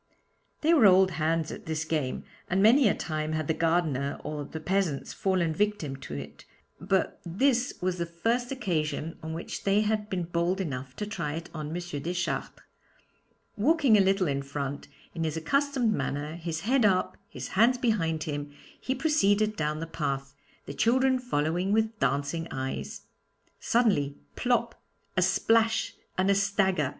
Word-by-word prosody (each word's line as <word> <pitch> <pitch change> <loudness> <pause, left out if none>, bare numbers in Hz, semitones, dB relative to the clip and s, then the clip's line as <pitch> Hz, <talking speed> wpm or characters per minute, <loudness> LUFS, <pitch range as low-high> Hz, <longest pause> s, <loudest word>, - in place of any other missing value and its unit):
They 320 +2 +4
were 245 -11 +7
old 190 0 +6
hands 160 0 0
at - - -9
this 160 0 -2
game, 150 -5 -2 0.3
and 190 - +1
many 245 +4 +6
a - - +1
time 155 -1 -3
had 155 -2 -2
the 160 - +2
gardener 160 -4 0
or 150 -1 -4
the 160 - -7
peasants 175 -4 -1
fallen 185 -4 +1
victims 195 -7 -1
to 75 - -6
it, 70 +1 -8 0.4
but - - 0
this 245 +8 +1
was 185 -1 0
the 170 - -1
first 230 +9 -1
occasion 165 - -2
on 160 0 -5
which 165 - -6
they 200 +1 +3
had 215 0 -1
been 185 -3 -1
bold 170 +2 0
enough 130 -7 -4
to 210 - -3
try 170 -9 -3
it 165 +1 -7
on 155 -2 -5
M. 155 - -5
Deschartres. 175 0 -2 1.1
Walking 275 +1 +4
a 205 - +6
little 195 -1 +2
in 140 -1 0
front, 140 0 -5 0.3
in 165 - -3
his 160 0 -2
accustomed 265 - +1
manner, 150 -4 -2
his 165 -1 -4
head 250 +5 +2
up, 190 -3 +2
his - - -7
hands 230 +6 +4
behind 165 -11 0
him, 145 -1 -4 0.3
he 260 - -2
proceeded 215 -8 +2
down 155 -1 -2
the - - -2
path, 140 -4 -3 0.3
the - - -6
children 260 - +3
following 180 -5 0
with 220 +1 +1
dancing 140 +5 0
eyes. 130 0 -4 0.6
Suddenly 195 - +2 0.2
plop, 235 -2 0 0.3
a - - +3
splash, 225 -1 +2 0.2
and 190 +1 +3
a - - +5
stagger! 195 -6 +1
175 Hz, 165 wpm, -28 LUFS, 155-215 Hz, 1.1 s, were